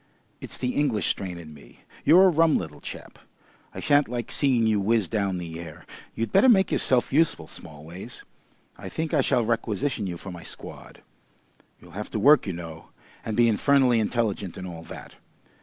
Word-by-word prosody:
It's - - -6
the 125 - -2
English 130 -8 0
strain 95 -3 -3
in 80 -3 -10
me. 70 - -17 0.2
You're 175 +6 +7
a - - +6
rum 165 -2 +3
little 75 -4 -7
chap. - - -10 0.5
I - - -8
shan't 145 0 +3
like 120 -1 -4
seeing 130 -5 +3
you 110 -2 +2
whizz 110 -1 +1
down 100 -4 -1
the 85 -2 -6
air.... 80 -3 -10 0.3
You'd 115 -1 -3
better 260 - +5
make 190 -5 +4
yourself 130 0 +1
useful, 160 +3 +2
Smallways. 80 +9 -10 0.6
I - - -7
think 160 +1 -4
I 150 - +4
shall 120 -2 +1
requisition 115 0 -1
you 85 -2 -5
for 95 - -9
my 85 -1 -9
squad. - - -11 0.8
You'll - - -16
have - - -6
to - - -3
work, 145 -3 +5
you 95 - -2
know, 80 -1 -9 0.4
and 110 - -4
be 120 -1 +5
infernally 125 +1 +3
intelligent 105 -4 -2
and 95 - -6
all 85 -2 -8
that. - - -11
110 Hz, 185 wpm, -25 LUFS, 90-135 Hz, 0.8 s, You're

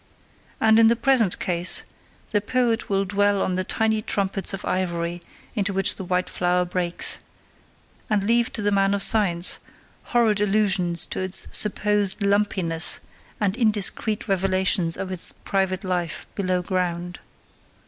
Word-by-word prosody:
And 220 0 +4
in 225 - +6
the 230 - +4
present 240 -6 +2
case 175 0 0 0.5
the 205 -2 +1
poet 235 +1 0
will 195 0 0
dwell 205 +1 +1
on 185 - -1
the 185 +1 -1
tiny 220 +2 0
trumpets 195 -2 -1
of 195 - -6
ivory 175 -1 -2 0.3
into 200 -3 -1
which 195 0 +2
the - - -6
white 180 0 -1
flower 180 0 0
breaks, 175 -1 -2 0.9
and 210 -3 +1
leave 230 +2 +1
to 210 - -2
the 205 - +1
man 195 0 +2
of 200 - +1
science 185 -6 +2 0.5
horrid 225 -4 +1
allusions 195 -5 +2
to - - -5
its 185 0 0
supposed 210 -1 +2
lumpiness 200 -5 +1 0.4
and 200 -2 0
indiscreet 215 -2 +1
revelations 190 -2 +2
of 190 -1 -5
its 185 -2 +2
private 190 0 -2
life 180 -3 -3
below 185 -2 -1
ground. 175 -1 -3
195 Hz, 145 wpm, -23 LUFS, 180-210 Hz, 0.9 s, in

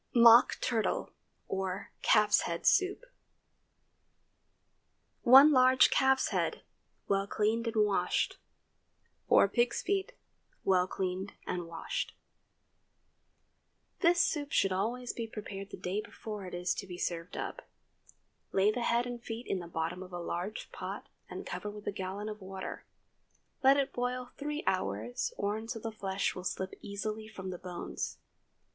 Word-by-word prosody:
MOCK 235 0 +8
TURTLE 230 -4 0 0.4
OR 190 0 -3
CALF'S 210 0 +5
HEAD 170 0 -4
SOUP. 395 -1 +4
✠ - - -34 2.2
1 270 +5 +9
large 255 -1 +6
calf's 265 0 +3
head, - - -1 0.4
well 195 0 +1
cleaned 220 +3 0
and 220 -2 +3
washed. 205 -2 0 0.9
4 - - +6
pig's 240 +4 +1
feet, 395 +5 -1 0.5
well 185 -1 +3
cleaned 190 +1 -3
and 175 -2 -3
washed. 165 -1 -4 1.8
This 345 0 +4
soup 295 -4 +1
should 195 - +3
always 235 +6 -1
be 230 -1 -4
prepared 200 -2 -7
the - - -8
day 190 +4 -2
before 210 -3 -7
it 180 - -6
is 180 +1 0
to 195 - -6
be 180 -1 -7
served 170 -1 -3
up. - - -5 0.8
Lay 195 +2 +4
the 245 - -3
head 235 +1 +2
and 245 -1 -5
feet 230 +1 -6
in 190 - -1
the 175 - -7
bottom 165 +2 -3
of 185 0 -9
a 175 - -5
large 175 +5 -4
pot, - - -6 0.2
and - - -7
cover - - -4
with 210 0 -9
a - - -1
gallon 195 +2 -5
of 215 -1 -6
water. 190 0 -7 0.8
Let 270 +1 +7
it 275 -1 0
boil 250 0 -2
three 295 +1 -4
hours, 115 - -1
or 205 +1 0
until 225 +1 -5
the 225 - -4
flesh 195 -2 -1
will 185 - -7
slip 190 +1 -3
easily 215 +2 -4
from 190 -3 -7
the 180 - -6
bones. 180 -1 -5
210 Hz, 150 wpm, -32 LUFS, 185-245 Hz, 2.2 s, 1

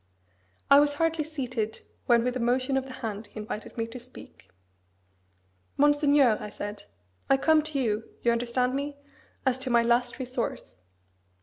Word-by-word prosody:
I 280 - +10
was 290 0 +3
hardly 325 0 +1
seated, 255 -8 -4 0.3
when 235 -1 +5
with 250 0 -1
a - - -2
motion 255 +3 +1
of 265 0 0
the 265 - -9
hand 210 0 -5
he - - -10
invited 210 +1 -7
me 225 - 0
to 230 +2 -9
speak. 250 - -14 1.3
"Monseigneur!" 290 -5 +4
I 210 - -5
said, 205 0 -7 0.4
"I 270 - +5
come 315 +3 +4
to 305 -2 -3
you 220 -3 -1
(you 235 - +4
understand 245 +2 0
me?) 280 +1 -3 0.5
as 260 -1 +2
to 260 0 -3
my 235 -1 +4
last 240 +1 +1
resource. 250 - -4
250 Hz, 165 wpm, -27 LUFS, 235-280 Hz, 1.3 s, I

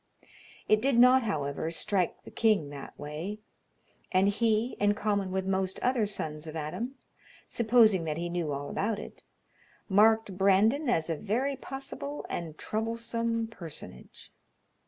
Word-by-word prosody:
It 215 0 +4
did 265 -1 +2
not, 250 +2 +7
however, 155 - -2
strike 185 +1 0
the - - -12
king 210 -11 +2
that 140 -1 -9
way, 155 +8 -5 0.7
and 190 +1 +4
he, 225 +3 +1
in 205 0 +3
common 205 -2 0
with 190 0 -2
most 190 0 -1
other 245 -4 +2
sons 155 -6 -4
of 155 - -7
Adam, 165 - -4 0.5
supposing 220 -5 +4
that 155 -1 -2
he 170 +1 -2
knew 170 -3 -2
all 140 0 -4
about 210 +1 -1
it, 210 - -9 0.7
marked 215 0 +4
Brandon 215 +9 +3
as 165 -9 +1
a 165 - -1
very 245 - -1
possible 275 +2 -6
and 160 -3 -5
troublesome 230 +1 -2
personage. 170 - -10
205 Hz, 140 wpm, -29 LUFS, 170-230 Hz, 0.7 s, not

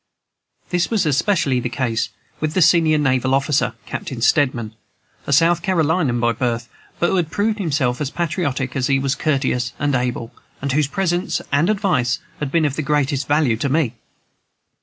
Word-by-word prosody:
This 175 0 +1
was 220 -6 +1
especially 145 -2 +1
the 120 - -3
case 120 -3 -1 0.3
with 155 0 -2
the 185 - +3
senior 160 -1 +4
naval 130 -2 +2
officer, 140 -3 +1
Captain 130 - -5
Steedman, 120 -4 +1 0.5
a - - -2
South 170 +4 +4
Carolinian 160 -7 +1
by 120 0 +2
birth, 120 0 -2 0.3
but 175 - +1
who 190 - +1
had 170 -3 0
proved 210 +4 0
himself 140 -8 0
as 140 - -1
patriotic 155 -6 -2
as 130 -2 0
he 135 - +3
was 135 0 0
courteous 130 -4 -1
and 145 0 0
able, 125 -2 -2 0.3
and 140 0 -2
whose 145 +1 +2
presence 175 +3 -1
and 145 +6 +2
advice 180 - +1 0.2
had 145 -3 -3
been 165 -1 +2
of 140 -2 -1
the - - 0
greatest 140 -2 0
value 145 -6 +2
to 140 +5 -1
me. 140 -4 +1
145 Hz, 175 wpm, -20 LUFS, 130-165 Hz, 0.5 s, senior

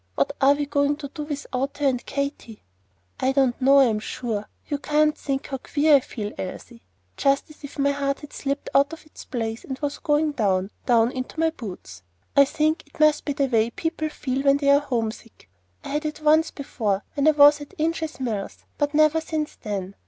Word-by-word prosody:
What 140 - +1
are 275 +1 +6
we 290 0 -2
going 285 0 +1
to 285 -2 -7
do 300 - -7
without 275 -2 -4
her 290 - -1
and 255 -3 +1
Katy?" 280 -6 -4 0.6
"I 260 +1 +1
don't 265 -2 +2
know 275 +2 +6
I'm 225 -5 +3
sure. 215 -1 -4 0.2
You 290 -2 -2
can't 305 +1 +2
think 275 -1 -3
how 270 -1 -5
queer 295 +2 +4
I - - +2
feel, 215 -5 -6
Elsie, 230 +5 -7 0.4
just 275 +2 +1
as 305 - -18
if 285 - -9
my 280 0 +2
heart 275 -1 -2
had 295 - -11
slipped 280 0 -3
out 280 +3 +3
of 325 - -10
its 310 - -13
place, 225 -2 -4
and 265 - -5
was 290 0 -3
going 300 +1 +1
down, 195 -6 0 0.2
down 235 -1 +4
into 255 +5 -6
my 325 0 +3
boots. 180 - -9 0.3
I 280 - +7
think 310 +3 0
it 290 - -20
must 305 -1 +4
be 285 - -1
the 280 0 +1
way 230 -3 +2
people 315 +4 -3
feel 265 -3 -3
when 275 0 +4
they 280 -1 +3
are 280 - +6
homesick. 230 - -4 0.4
I - - -7
had 300 +2 -2
it 300 0 -6
once 315 +2 +4
before 215 -8 -2
when 285 +1 +1
I - - +8
was 290 0 +7
at 290 - -11
Inches 320 -1 -2
Mills, 220 -6 -4
but 290 0 0
never 310 +1 +4
since 315 -1 -3
then. 200 -3 -4
280 Hz, 210 wpm, -24 LUFS, 240-300 Hz, 0.6 s, I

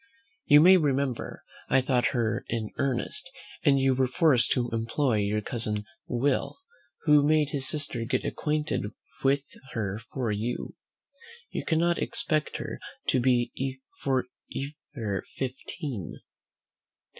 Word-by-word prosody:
You 145 0 +8
may 185 +3 +8
remember 140 -5 -1 0.3
I 135 - +5
thought 125 -1 +2
her 115 -4 0
in 110 -2 -2
earnest, 130 -3 -1 0.3
and 140 -1 +5
you 135 0 +4
were 130 0 +2
forced 130 -3 +3
to 120 -1 0
employ 115 +2 +1
your 105 +1 +1
cousin 105 -2 -2 0.2
Will, 130 +3 0 0.5
who 150 -2 +6
made 150 0 +3
his 135 -2 0
sister 130 -5 0
get 115 - -1
acquainted 150 -8 -1 0.3
with 135 +1 +3 0.3
her 105 -2 -2
for 125 -5 -1
you. 110 +4 -3 0.8
You - - -3
cannot 170 +1 +2
expect 155 -3 0
her - - -5 0.3
to - - +4
be 130 +2 +1 0.2
for 130 -2 +1 0.7
ever 105 -7 -2
fifteen." 130 - -5
130 Hz, 125 wpm, -28 LUFS, 115-145 Hz, 0.8 s, You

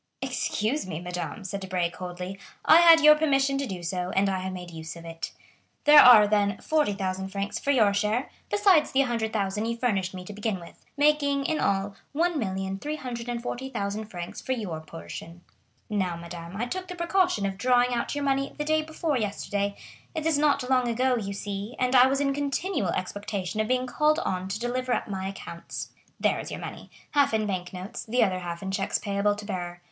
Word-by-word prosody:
"Excuse 220 +2 -1
me, 160 -3 -4
madame," 180 +4 -5
said 195 +1 -4
Debray 185 -3 -1
coldly, 180 +2 -6 0.3
"I 320 - +8
had 335 -1 +8
your 300 0 +9
permission 275 -3 +2
to 275 - -2
do 185 -3 -6
so, 180 +1 -2
and 195 +1 +3
I 190 -1 -1
have 190 0 -4
made 180 -1 -7
use 160 0 -7
of 170 0 -11
it. 165 0 -6 0.5
There 295 0 +9
are, 235 -4 +9
then, 205 -1 +1
40,000 195 -11 0
francs 200 +1 -3
for - - -4
your 220 -7 +4
share, 210 +5 0 0.2
besides 390 -6 +4
the 270 - +4
100,000 220 -5 -1
you 230 0 -2
furnished 195 -7 0
me 180 -1 -7
to 210 - -8
begin 205 -1 -2
with, 170 - -14
making 285 -1 +3
in 315 +1 0
all 195 0 0 0.2
1,340,000 235 - -3
francs 175 -4 -7
for 260 - -1
your 200 -10 -4
portion. 155 - -9 0.5
Now, 190 -5 -1
madame, 170 +2 -8
I 235 - -1
took 370 +9 -4
the 360 - -6
precaution 345 - +1
of 195 -1 -3
drawing 250 +1 +3
out 240 +4 -1
your 290 - -2
money 275 0 0
the 295 - -2
day 310 +1 +2
before 315 -2 -2
yesterday; 200 -1 -2 0.4
it 315 -1 -2
is 320 -3 +2
not 285 -3 +2
long 255 -1 +3
ago, 250 +2 +2
you 200 -4 -3
see, 200 +3 -5
and 255 +1 +1
I 250 0 +8
was 270 +1 +1
in 275 -1 +1
continual 285 - -1
expectation 200 +1 -3
of 215 - -1
being 255 +1 +1
called 300 +4 +2
on 185 - -2
to 200 +2 -3
deliver 250 +1 -1
up - - -1
my 190 -2 -3
accounts. 180 -3 -7 0.3
There - - +2
is - - -6
your - - -5
money,—half 280 -5 -1
in 215 -1 +1
bank 185 -3 -3
notes, 190 +6 -6
the 245 +3 +2
other 185 -3 0
half 175 0 -6
in 190 - -3
checks 195 0 0
payable 205 0 0
to 210 0 -8
bearer. 175 -3 -4
210 Hz, 195 wpm, -27 LUFS, 190-275 Hz, 0.5 s, your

